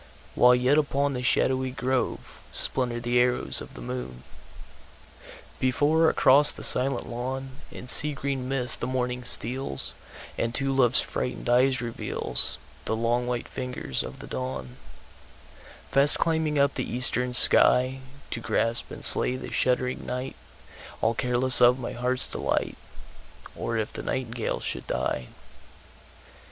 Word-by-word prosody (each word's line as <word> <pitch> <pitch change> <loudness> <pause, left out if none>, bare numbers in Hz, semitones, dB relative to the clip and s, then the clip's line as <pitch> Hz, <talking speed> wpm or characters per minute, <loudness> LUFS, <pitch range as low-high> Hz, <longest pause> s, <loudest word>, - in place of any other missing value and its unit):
While 125 0 +5
yet 130 +4 +2
upon 140 -1 -1
the 125 - -4
shadowy 130 +1 0
groveSplinter 125 -1 -2
the 120 +1 +1
arrows 125 0 -1
of - - -12
the - - -10
moon. 60 0 -7 1.4
Before 150 +5 +2
across 145 +3 +4
the - - -9
silent 130 0 0
lawnIn 130 +2 -5 0.4
sea 150 +4 +6
green 135 -2 -4
mist 125 -3 0
the 120 - -2
morning 125 -1 -3
steals, 120 - 0 0.5
And 115 0 -2
to 135 -1 -1
love's 125 -2 +5
frightened 125 0 -5
eyes 130 +2 +3
revealsThe 120 -2 0 0.4
long 120 +1 -1
white 120 -1 -3
fingers 125 - -4
of 65 0 -8
the - - -11 1.7
dawnFast 140 +1 +4
climbing 160 -2 -1
up 140 0 +2
the - - -5
eastern 125 0 +3
skyTo 130 +1 +3
grasp 115 +1 -1
and - - -5
slay 125 - +5
the 130 - -8
shuddering 125 0 -1
night, 125 +1 -5 0.7
All 110 - +1
careless 125 +2 +3
of 125 +1 +5
my 125 -2 -6
heart's 125 +1 -2
delight, - - -2 0.8
Or 115 - -4
if 110 -1 -4
the - - -6
nightingale 120 -3 -4
should - - -5
die. 65 0 -3
125 Hz, 130 wpm, -25 LUFS, 120-135 Hz, 1.7 s, sea